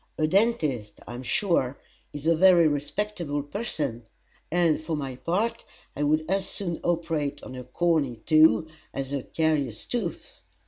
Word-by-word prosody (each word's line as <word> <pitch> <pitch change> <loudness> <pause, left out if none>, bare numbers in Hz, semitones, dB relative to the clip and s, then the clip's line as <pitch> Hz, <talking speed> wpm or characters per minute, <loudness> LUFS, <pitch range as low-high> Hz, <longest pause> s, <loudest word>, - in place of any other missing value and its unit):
A 155 - +2
dentist, 155 - +1
I 120 - -8
am 120 - -6
sure, 140 - +1 0.3
is 145 0 -8
a 165 - +5
very 175 -1 +6
respectable 150 0 -2
person; 145 - -4 0.4
and, 170 -2 +3
for 160 0 -2
my 135 -3 -4
part, 215 - -1 0.3
I - - -4
would 155 +2 +2
as 195 +2 0
soon 175 -5 -3
operate 160 -4 -1
on 130 - -8
a 125 - -6
corny 145 -1 +1
toe 155 +1 +6 0.3
as 135 0 -3
a 140 - -1
carious 145 -7 -1
tooth. 205 -10 -4
155 Hz, 150 wpm, -26 LUFS, 140-175 Hz, 0.4 s, very